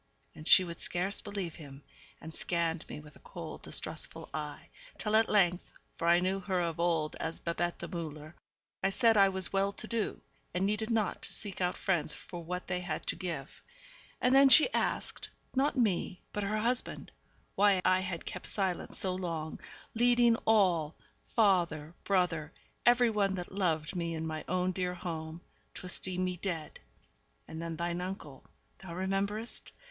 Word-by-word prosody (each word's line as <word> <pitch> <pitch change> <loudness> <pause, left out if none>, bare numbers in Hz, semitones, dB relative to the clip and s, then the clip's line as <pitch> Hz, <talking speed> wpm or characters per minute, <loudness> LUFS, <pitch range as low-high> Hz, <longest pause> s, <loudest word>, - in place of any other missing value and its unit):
And 155 - -10
she 185 - +8
would 170 -1 -7
scarce 185 +3 -1
believe 200 -5 -4
him, 140 -3 -11 0.4
and 160 - -9
scanned 170 -1 -1
me - - -6
with 150 0 -14
a - - -16
cold, 485 - -8
distrustful - - -3
eye, - - -5 0.3
till 215 -1 0
at 225 0 +4
length 180 -4 +3 0.3
for 165 - -2
I 170 +1 +6
knew 190 +2 0
her 185 -1 -1
of 170 -1 -2
old 165 -3 +1
as 160 0 -3
Babette 175 +1 -2
Müller 155 -2 -6 0.5
I 195 - +2
said 230 +3 +4
that - - 0
I - - +3
was 190 -1 -3
well 195 +1 +2
to 215 - -6
do, 230 -2 -2 0.4
and 185 +2 +1
needed 210 +2 -1
not 220 -5 0
to - - -2
seek 200 -3 0
out 180 0 0
friends 165 -5 0
for 170 +3 -8
what 180 +2 -4
they 180 -1 -2
had 175 -4 -4
to - - 0
give. 165 -7 -5 0.6
And 250 - +3
then 275 0 +8
she 315 - +7
asked - - -1 0.3
not 280 +2 +2
me, 195 -5 +1
but 210 - -2
her 205 +2 -1
husband 240 +3 0 0.4
why 200 -1 +4
I 185 0 +5
had 180 -3 -4
kept - - -5
silent 190 -3 -1
so 185 -1 +6
long, 165 -4 -4 0.3
leading 240 0 +4
all 180 -8 +3 0.4
father, 175 -8 +2
brother, 175 -6 +1 0.4
every 240 -1 +6
one 200 -2 +1
that 180 -1 -6
loved 170 -5 0
me 170 -1 -2
in 160 0 -3
my 155 -1 -4
own 185 +1 +1
dear 180 -1 -2
home 165 -2 -5 0.3
to - - -8
esteem 185 0 0
me 180 -1 -1
dead. 165 -4 -4 0.7
And 160 0 -7
then 165 -1 -4
thine 170 +1 -2
uncle 180 -8 -6 0.4
(thou 175 -3 -8
rememberest?) 195 +4 -1
180 Hz, 175 wpm, -32 LUFS, 170-200 Hz, 0.7 s, she